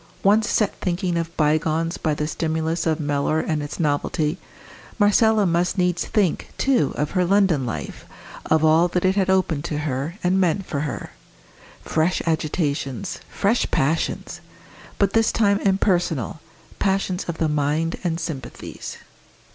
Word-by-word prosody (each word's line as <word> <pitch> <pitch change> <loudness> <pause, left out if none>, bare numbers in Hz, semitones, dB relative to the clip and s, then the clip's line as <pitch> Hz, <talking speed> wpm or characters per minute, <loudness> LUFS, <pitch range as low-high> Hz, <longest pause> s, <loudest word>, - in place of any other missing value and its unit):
Once 215 +3 +4
set 210 -3 +1
thinking 180 0 -1
of 165 0 -3
bygones 155 +2 +1
by 155 -2 0
the 150 - -2
stimulus 160 +1 -1
of 160 0 +1
Mellor 145 +1 0
and 155 -1 -1
its 145 - -6
novelty, 150 +2 0 0.6
Marcella 215 0 +4
must 175 +2 +1
needs 180 -1 +1
think, 200 -6 0
too, 260 - +2
of 150 +1 -1
her 185 -1 +2
London 180 -8 +2
life, 110 - -6 0.4
of 160 0 +3
all 160 +3 +5
that 180 +1 -1
it 190 +1 +3
had 190 -2 +1
opened 180 -6 +1
to 150 - -2
her, 150 +2 -3
and 185 +2 +2
meant 185 +2 +1
for 145 - -3
her. 145 -1 -4 0.7
Fresh 160 +3 +1
agitations! 155 0 -2
fresh 215 +4 +1
passions! 155 +4 -1 0.6
but 200 -1 +2
this 225 -1 +3
time 200 -2 +2
impersonal, 180 - 0 0.4
passions 190 -2 0
of 170 -2 -4
the 160 - +1
mind 150 +2 0
and 165 -2 -1
sympathies. 155 -6 -6
165 Hz, 145 wpm, -23 LUFS, 155-190 Hz, 0.7 s, all